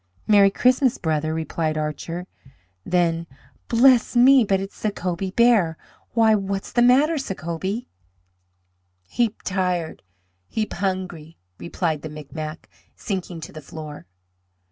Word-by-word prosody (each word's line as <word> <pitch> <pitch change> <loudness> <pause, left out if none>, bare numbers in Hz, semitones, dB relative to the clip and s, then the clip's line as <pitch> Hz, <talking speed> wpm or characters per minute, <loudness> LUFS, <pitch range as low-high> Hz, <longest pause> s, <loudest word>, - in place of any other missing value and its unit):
"Merry 200 -2 +6
Christmas, 255 +4 +2
brother!" 155 -2 -1
replied 160 0 -2
Archer. 155 +3 -4 0.6
Then, 170 -2 0 0.4
"Bless 245 +1 +4
me, 255 +1 +7
but 195 -2 +1
it's 195 +1 -7
Sacobie 190 -3 -3
Bear! 220 -9 +4 0.4
Why, 225 -1 +4
what's 195 -1 -2
the 240 - +2
matter, 280 +6 +4
Sacobie?" 190 +1 -4 1.2
"Heap 225 - -2
tired! 180 -4 -2 0.5
Heap 215 - -3
hungry!" 180 -4 -4 0.2
replied 165 -3 -2
the 155 - -6
Micmac, 155 +1 -7 0.3
sinking 185 -4 -5
to - - -8
the 155 - -9
floor. 150 -2 -9
185 Hz, 115 wpm, -23 LUFS, 160-220 Hz, 1.2 s, me